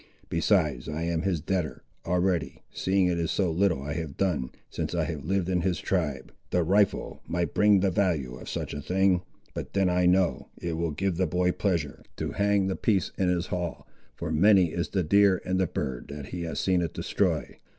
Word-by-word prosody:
Besides 80 - +1
I 80 +2 -3
am 85 -1 0
his 90 -4 0
debtor, 80 -6 -2 0.2
already, 90 -1 0
seeing 95 0 +1
it 90 -1 +1
is 85 -1 -1
so 95 -4 +1
little 85 -5 +1
I 75 0 -3
have 80 -4 -5
done, 85 -10 0 0.2
since - - -4
I - - +1
have 75 -4 -4
lived 95 0 0
in 90 -2 +1
his 90 0 0
tribe. 75 -8 -2 0.2
The 90 - +2
rifle 100 +4 +1
might 85 0 -1
bring 105 -2 +5
the 95 -1 +2
value 85 -10 0
of - - -9
such - - -4
a 75 - -4
thing—but 90 +2 -1
then 95 -2 +2
I 90 0 +3
know, 90 0 +2
it 85 -1 -3
will 85 +1 -1
give 85 +4 -1
the 95 0 +2
boy 90 +2 +1
pleasure 85 -7 -1
to - - -3
hang 100 -1 +2
the 95 0 -1
piece 100 -5 +1
in 95 -2 +1
his 85 -1 0
hall, 90 -3 -3 0.3
for 85 -1 -4
many 90 +1 +5
is 85 - -2
the 95 -3 0
deer 100 +2 +4
and 95 0 0
the 95 - +2
bird 65 -5 -4
that 70 -1 -8
he 90 - -5
has 80 -3 -3
seen 95 -2 +2
it 85 - -3
destroy. - - -1
90 Hz, 205 wpm, -27 LUFS, 80-95 Hz, 0.3 s, bring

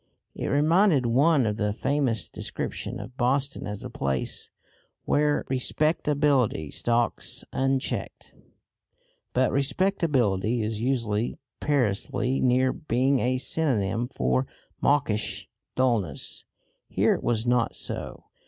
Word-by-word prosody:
It - - -4
reminded 155 0 +3
one 135 +3 +4
of 105 -1 -1
the 105 -1 0
famous 125 -4 0
description - - -5
of 125 - -9
Boston 135 +2 0
as 105 -1 -5
the - - -6
place 70 -2 -2 0.6
"where 150 0 +2
respectability 140 - +1
stalks 120 -2 0
unchecked." 135 0 -2 1.0
But 130 0 +2
respectability 135 - +1
is 110 0 -3
usually 115 -3 -1 0.2
perilously 125 -1 0
near 130 +1 +3
being 135 -2 +1
a 130 +1 +1
synonym 120 -6 0
for 65 - 0 0.3
mawkish 140 -7 0 0.3
dullness. 115 - -1 0.4
Here - - +2
it - - -3
was 115 -1 0
not 120 -1 +1
so. - - -4
125 Hz, 105 wpm, -26 LUFS, 110-140 Hz, 1.0 s, one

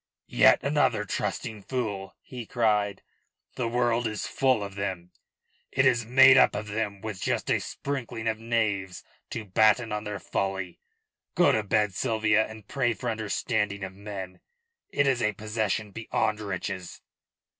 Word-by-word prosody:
"Yet - - +5
another 130 -7 +2
trusting 105 +1 -3
fool," 105 -5 -4
he 120 -4 -8
cried. 105 -5 +1 0.5
"The 125 - -2
world 120 0 +1
is 110 -1 -3
full 130 -6 +1
of 100 -1 -6
them 95 -3 -4 0.6
it 130 0 +2
is 120 -4 +3
made 135 +2 +8
up - - +5
of 105 +1 -4
them, 105 -2 -3
with 110 -3 -6
just - - -1
a - - +3
sprinkling 125 -5 -4
of 110 0 0
knaves 105 -5 -1 0.3
to 110 - -5
batten 110 +3 +3
on 105 0 -2
their 105 -1 -4
folly. 95 -2 -3 0.6
Go - - +5
to 110 - +2
bed, 105 -1 +1
Sylvia, 110 -1 +2
and 110 -2 -12
pray 120 -4 0
for 120 +1 -2
understanding 105 -1 -1
of 95 0 -5
men. 95 -2 -7 0.5
It 145 - +1
is 130 -3 +2
a 105 -2 +1
possession 110 0 -2
beyond 110 0 -1
riches." 95 -2 -5
110 Hz, 155 wpm, -27 LUFS, 100-115 Hz, 0.6 s, made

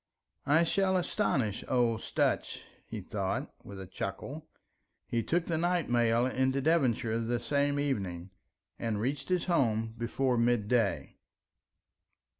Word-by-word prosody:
"I 155 +4 +5
shall 190 +2 +2
astonish 130 - 0
old 120 -3 +2
Sutch," - - -1 0.2
he - - -5
thought, - - -3
with 100 -1 -9
a 95 - -6
chuckle. 135 - -6 0.6
He 115 - -1
took 165 +9 0
the 160 -2 -1
night 175 -5 0
mail 120 0 +3
into 130 +1 +1
Devonshire 130 -7 +2
the 120 +1 -1
same 145 +3 +1
evening, 95 -10 -2 0.5
and 110 -3 -1
reached 135 - -2
his 180 -2 +1
home 115 - +1
before 125 +1 0
midday. 115 -2 +1
125 Hz, 125 wpm, -31 LUFS, 115-150 Hz, 0.6 s, I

